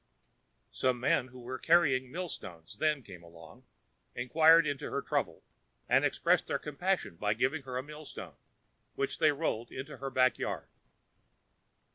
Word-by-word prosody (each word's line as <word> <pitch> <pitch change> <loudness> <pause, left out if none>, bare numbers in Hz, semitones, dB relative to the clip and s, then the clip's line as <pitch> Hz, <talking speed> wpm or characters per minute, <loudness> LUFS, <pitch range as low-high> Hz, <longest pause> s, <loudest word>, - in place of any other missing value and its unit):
Some 130 -1 0
men 125 0 +2
who 130 0 -13
were 125 +1 -6
carrying 140 -6 +3
mill 180 +4 -3
stones 85 - -9
then 150 -3 +1
came 90 -5 -11
along, 85 -1 -15 0.5
inquired 160 +6 +5
into 145 -2 -3
her - - -2
trouble, - - -2 0.4
and - - +4
expressed - - +2
their - - 0
compassion 155 - -2
by 105 +3 0
giving 135 +6 0
her 130 -2 -5
a 130 - -2
mill 150 +1 -10
stone, - - -8 0.6
which 410 0 -2
they 155 - +5
rolled 140 -6 -2
into 130 +1 -7
her 135 - -4
back 130 -1 +3
yard. - - -4
130 Hz, 155 wpm, -31 LUFS, 125-155 Hz, 0.6 s, inquired